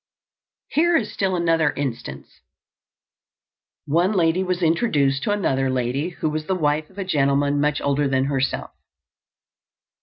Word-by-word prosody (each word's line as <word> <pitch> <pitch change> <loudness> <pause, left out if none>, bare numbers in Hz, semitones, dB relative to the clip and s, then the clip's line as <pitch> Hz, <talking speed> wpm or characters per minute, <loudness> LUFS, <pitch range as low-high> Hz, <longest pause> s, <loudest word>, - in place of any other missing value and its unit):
Here 335 +2 +3
is 225 - -3
still 190 -2 0
another 165 -3 +2
instance: 115 - -6 1.4
One 170 +7 +2
lady 175 -1 +2
was 180 -1 -2
introduced 150 - +2
to 205 - -1
another 135 -10 0
lady 130 +5 -1
who 165 -2 -3
was 155 0 -4
the 190 - 0
wife 150 -2 0
of 190 - -22
a 195 - -3
gentleman 145 -3 +1
much 150 0 +1
older 140 0 +1
than 135 -1 +1
herself. 135 -1 -2
150 Hz, 140 wpm, -22 LUFS, 140-180 Hz, 1.4 s, Here